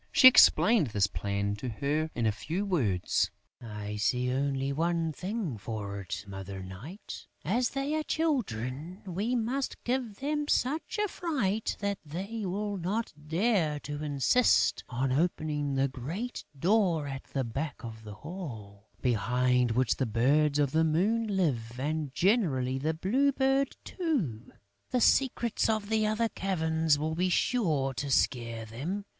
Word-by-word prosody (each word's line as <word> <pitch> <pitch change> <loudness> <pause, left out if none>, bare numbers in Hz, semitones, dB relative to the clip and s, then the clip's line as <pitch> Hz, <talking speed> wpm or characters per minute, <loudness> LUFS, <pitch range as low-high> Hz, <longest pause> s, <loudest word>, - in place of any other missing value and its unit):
She 255 - +9
explained 230 - +7
this 105 -3 +2
plan 100 0 -2
to 125 +4 -4
her 145 +7 -1
in 120 - 0
a 110 - +4
few 160 - -3
words: 100 - +1 0.3
"I 105 -2 -6
see 125 +4 +1
only 135 0 0
one 165 +1 0
thing 185 - -4
for 100 -2 -5
it, 95 +1 -5
Mother 95 -1 -7
Night: 115 - -9 0.2
as 235 +9 +1
they 275 +2 -2
are 310 - +1
children, 180 - -2
we 200 +7 -1
must 250 +4 -2
give 245 -4 -1
them 295 +4 -2
such 300 - 0
a 420 0 +1
fright 255 - -1
that 200 -1 -1
they 195 +7 -5
will 205 +2 -2
not 200 +6 -2
dare 165 -3 +1
to 145 0 -5
insist 150 - +3
on 130 +1 -1
opening 150 -1 0
the 135 +1 +2
great 160 - -5
door 175 -2 +2
at 135 -1 -6
the 135 - -2
back 135 +6 -3
of 110 -1 -8
the 105 -1 -9
hall, 110 - -8
behind 125 +1 +2
which 125 +2 +1
the 130 - 0
Birds 140 +7 +3
of 145 -3 +2
the 160 +2 +3
Moon 200 +9 +2
live 130 - -1
and 150 0 -2
generally 140 - +1
the 155 +3 -1
Blue 255 - +2
Bird 270 0 +1
too. 225 - -2 0.4
The 250 - +1
secrets 240 -2 +2
of 215 -2 0
the 220 -1 +2
other 220 +2 +1
caverns 160 -6 +1
will 155 +2 -2
be 180 +3 +1
sure 160 - +1
to 140 +2 -4
scare 115 -4 +1
them. 155 - -4
155 Hz, 150 wpm, -30 LUFS, -, 0.4 s, She